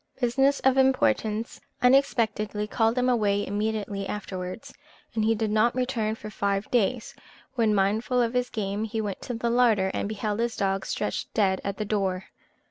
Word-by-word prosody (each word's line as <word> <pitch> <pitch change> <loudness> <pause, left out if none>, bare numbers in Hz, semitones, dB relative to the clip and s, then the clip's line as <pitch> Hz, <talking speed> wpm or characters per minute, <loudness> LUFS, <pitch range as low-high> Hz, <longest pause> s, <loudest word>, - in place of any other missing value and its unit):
Business 270 +3 +2
of 265 0 +3
importance 220 - +1 0.2
unexpectedly 220 -5 +2
called 225 +2 +1
him 250 0 +2
away 205 -5 +2
immediately 205 -1 -2
afterwards, 200 +5 -6 0.4
and 220 -2 0
he 225 +1 +3
did 215 -1 -1
not 220 +3 +3
return 240 -4 -1
for 215 -1 -9
five 200 0 -1
days; 240 0 0 0.4
when, 225 -4 +2
mindful 215 +6 +1
of 235 -1 +1
his 250 0 0
game, 205 -1 -3
he 220 0 -3
went 205 -3 -3
to 245 - -5
the 235 +1 -1
larder, 225 -6 +3
and 200 - -2
beheld 215 0 -2
his 235 0 -1
dog 195 0 -1
stretched 210 - -3
dead 190 -3 +2
at 200 0 -3
the 215 - -2
door. 190 -3 -1
215 Hz, 170 wpm, -26 LUFS, 200-240 Hz, 0.4 s, of